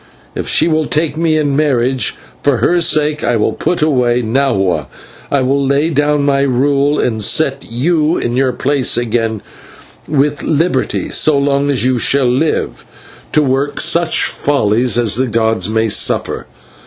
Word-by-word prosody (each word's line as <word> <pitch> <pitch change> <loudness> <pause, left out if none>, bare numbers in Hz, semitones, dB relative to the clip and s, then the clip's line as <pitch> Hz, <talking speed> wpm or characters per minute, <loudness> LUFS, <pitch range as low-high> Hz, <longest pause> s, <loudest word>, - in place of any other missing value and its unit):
If - - -5
she - - +2
will 155 -2 0
take 155 -1 -1
me 160 -1 +1
in 145 -2 0
marriage, 130 -3 0 0.3
for 140 -3 +1
her 175 +10 +1
sake 150 -2 +1
I 120 - +1
will 105 - 0
put 175 -3 -1
away 125 -5 +1
Nahua; 100 - 0 0.4
I 140 - +1
will 135 +2 0
lay 140 +4 +1
down 145 0 +1
my 140 -1 +2
rule 140 +2 +1
and 110 -3 -1
set 140 +4 0
you 155 +6 0
in 120 - -2
your 130 0 +1
place 140 0 0
again, 115 -2 -2 0.6
with 145 0 0
liberty, 155 -3 -1
so 155 -2 +3
long 140 0 0
as 130 -3 0
you 130 -1 +1
shall 135 +3 +2
live, 135 +6 -1 0.5
to 150 - +3
work 135 +1 -1
such 170 0 +2
follies 120 -3 0
as 115 -3 +1
the 130 +1 0
gods 110 -4 0
may 110 +1 0
suffer. 105 - -1
140 Hz, 160 wpm, -14 LUFS, 120-150 Hz, 0.6 s, so